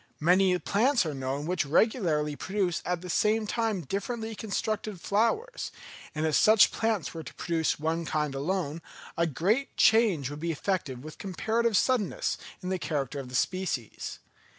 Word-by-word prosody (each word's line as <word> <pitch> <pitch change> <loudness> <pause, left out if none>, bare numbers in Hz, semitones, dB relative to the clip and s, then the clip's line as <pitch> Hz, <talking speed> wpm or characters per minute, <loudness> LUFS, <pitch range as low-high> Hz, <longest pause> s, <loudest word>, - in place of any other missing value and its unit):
Many 180 +3 +4
plants 230 +5 +2
are 155 - -2
known 135 +2 -3
which 180 0 0
regularly 155 - +2
produce 190 0 -1
at 180 -1 -1
the 180 - -8
same 215 +5 +2
time 220 -3 -1
differently 220 - -3
constructed 215 -1 -3
flowers; 230 - 0 0.4
and 155 +1 0
if 155 - +1
such 215 +7 +6
plants 220 -9 -1
were 165 - -5
to - - -10
produce 165 -3 0
one 160 +2 -1
kind 150 -2 -1
alone, 165 +2 -2 0.3
a 170 0 +2
great 200 - 0
change 210 - +4
would 145 - -7
be 170 +1 -1
effected 145 -6 -2
with 155 0 -10
comparative 220 +3 0
suddenness 245 -6 +1 0.2
in 180 - -3
the 185 -1 -1
character 140 -4 -2
of 130 -2 -7
the 125 - -6
species. 175 - -2
180 Hz, 160 wpm, -28 LUFS, 155-215 Hz, 0.4 s, such